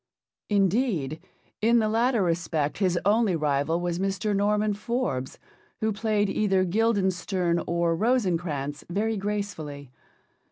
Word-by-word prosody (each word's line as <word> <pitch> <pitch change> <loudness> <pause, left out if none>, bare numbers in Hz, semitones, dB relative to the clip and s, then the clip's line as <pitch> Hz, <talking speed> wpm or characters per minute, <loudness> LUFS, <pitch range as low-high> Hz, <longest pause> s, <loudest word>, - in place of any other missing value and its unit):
Indeed, 195 - +1 0.4
in 230 +2 +4
the 220 -2 +2
latter 230 0 +2
respect 165 -3 -1
his 185 -3 +2
only 210 -2 +3
rival 150 +1 0
was 175 0 -2
Mr. 195 +2 -1
Norman 210 +1 +1
Forbes, 210 - -3 0.4
who 220 0 0
played 210 -1 0
either 195 -2 +1
Guildenstern 190 -4 +1
or 170 -1 +1
Rosencrantz 170 - 0
very 215 +5 0
gracefully. 195 -10 -4
195 Hz, 115 wpm, -26 LUFS, 170-215 Hz, 0.4 s, in